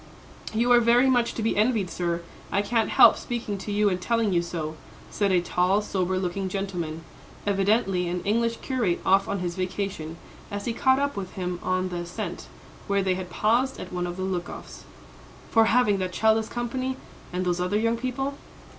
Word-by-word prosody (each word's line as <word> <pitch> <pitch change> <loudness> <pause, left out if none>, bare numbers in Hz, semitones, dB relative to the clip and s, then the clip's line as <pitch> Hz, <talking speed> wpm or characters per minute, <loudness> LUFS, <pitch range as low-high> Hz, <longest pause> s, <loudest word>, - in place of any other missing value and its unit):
"You 235 +3 +1
are 240 - +8
very 240 +2 +4
much 245 -2 +2
to 225 - -3
be 225 - +1
envied, 210 -4 +1
sir. 170 -1 -2 0.3
I 200 - +2
can't 225 +1 +1
help - - +7
speaking 225 -4 -4
to 205 - -5
you 205 +1 +2
and 185 -2 0
telling 230 -1 +1
you 170 - +3
so," 160 -2 -4 0.4
said 200 -2 +1
a 180 -2 +4
tall, 180 +3 +2
sober 185 -2 -1
looking 185 +1 -2
gentleman, 175 -5 -4 0.4
evidently 195 -2 +2
an 175 +1 -3
English 230 +2 +1
curate 235 -10 0
off 195 +1 +4
on 200 -2 -2
his 175 -1 -3
vacation, 185 -3 -3 0.3
as 205 -1 -5
he 235 - -1
caught 260 +3 +3
up 285 +1 0
with 190 -2 -5
him 180 -1 -3
on 185 0 0
the 175 - -4
ascent, 175 +2 -5 0.4
where 200 -1 +1
they 190 -1 +2
had 185 -1 -5
paused 240 +8 +1
at - - -8
one 180 0 -1
of 175 +1 -6
the 185 - -3
look 180 -2 -2
offs, - - -10 0.7
"for 225 0 +5
having 220 -4 +3
that 185 -1 -2
child 220 +3 +4
as 220 - -5
company, 255 +2 -3 0.3
and 180 +1 -2
those 180 0 0
other 180 +3 +1
young 230 +2 +1
people." 255 +3 -2
200 Hz, 200 wpm, -26 LUFS, 180-230 Hz, 0.7 s, are